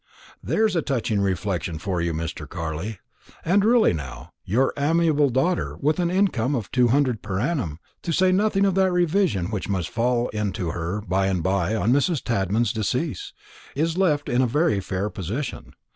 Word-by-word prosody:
There 220 - +1
is 210 -4 0
a 165 - +2
touching 115 -8 -1
reflection 95 -3 -1
for 90 +1 -2
you, 85 0 0
Mr. 80 0 -5
Carley! 85 +5 -4 0.5
And 195 +4 +3
really 230 - +4
now, 70 0 -7
your 125 +8 +1
amiable 150 -1 +2
daughter, 135 +8 0
with 150 +4 +1
an 175 -1 +1
income 165 - +1
of 115 -5 -4
two 125 -2 +3
hundred 130 -2 +1
per 95 -1 -3
annum 125 - -1 0.2
to 170 - -3
say 185 +3 +3
nothing 200 +1 +2
of 195 - +2
that 190 0 +3
reversion 175 - +1
which 105 -2 -3
must 95 -4 -1
fall 120 +1 +1
in 105 -3 -2
to 85 -3 -3
her 85 +5 -3
by 95 -1 0
and 90 -4 -1
by 95 +2 +1
on 110 +2 +2
Mrs. 145 +2 +1
Tadman's 110 +1 0
decease 125 - -2 0.4
is 160 +3 0
left 155 -6 +1
in 120 +1 +2
a 130 - +2
very 150 -3 +2
fair 95 +2 -3
position. 110 - -5
120 Hz, 185 wpm, -24 LUFS, -, 0.5 s, really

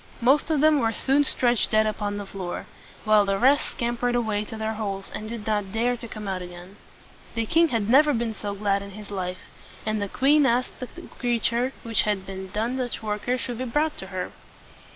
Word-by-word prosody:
Most 270 +7 +3
of 305 -3 +2
them 310 -1 +5
were 225 -3 +2
soon 275 +6 +3
stretched 245 -4 +2
dead 215 0 +4
upon 210 -1 -2
the 205 - -5
floor, 190 -2 -5 0.4
while 215 -1 +6
the 195 0 0
rest 270 +6 +3
scam 235 0 -1
pered 245 0 +1
away 220 -3 0
to 220 - -7
their 220 0 -2
holes, 200 -3 -4
and 215 - -5
did 230 -2 -6
not 205 -3 -1
dare 235 +3 +1
to 235 0 -8
come 215 -2 -7
out 190 -1 -2
again. 180 +2 -10 0.6
The 230 -1 0
king 330 +8 +4
had 230 -8 -1
never 295 +6 +6
been 235 -3 -1
so 205 -1 -5
glad 200 -1 +1
in 200 - -8
his 210 -1 -9
life; 185 -2 -3 0.4
and 215 -1 0
the 200 - -2
queen 285 +4 +4
asked 245 +1 0
that 255 - -8
the 350 - -9
creature 240 0 0
which 230 -1 +2
had 205 -3 -1
done 195 +6 -3
such 245 -2 -3
wonders 215 +4 -1
should 245 -2 -4
be 255 - -2
brought 295 +5 0
to 190 - -7
her. 185 -1 -4
220 Hz, 215 wpm, -25 LUFS, 205-245 Hz, 0.6 s, while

